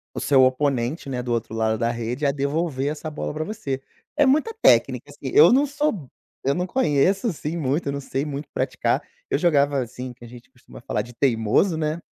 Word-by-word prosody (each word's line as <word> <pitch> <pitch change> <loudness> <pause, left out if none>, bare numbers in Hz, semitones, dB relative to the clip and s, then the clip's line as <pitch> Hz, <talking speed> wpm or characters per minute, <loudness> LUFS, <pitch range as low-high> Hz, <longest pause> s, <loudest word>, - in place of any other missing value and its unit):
o - - -2
seu 135 -2 +4
oponente, 130 +1 0
né, 125 -2 -2
do 120 -1 -4
outro 115 -1 -2
lado 110 0 0
da 115 0 0
rede, 120 +4 -3
a 140 - +3
devolver 140 0 -1
essa 155 +1 -5
bola 150 - -4
pra 155 - -2
você. 145 -10 -4 0.4
É 295 - +5
muita 300 +11 +3
técnica - - +3
assim. - - -7
Eu 440 - +8
não 275 +3 +4
sou 285 - -2 0.3
eu 140 +1 +1
não 180 - -1
conheço 190 - +1
assim 165 -4 -3
muito, 145 +1 -1
eu - - 0
não 140 - -3
sei 135 +1 -3
muito 145 0 -5
praticar, - - 0 0.3
eu - - +1
jogava 145 -5 +2
assim, 125 +1 -7
que 120 0 -18
a - - -10
gente 125 +2 -14
costuma 125 - -15
falar 105 - -2
de 120 +2 -13
teimoso, 120 - +2
né. 155 +1 -1
140 Hz, 215 wpm, -23 LUFS, 125-165 Hz, 0.4 s, Eu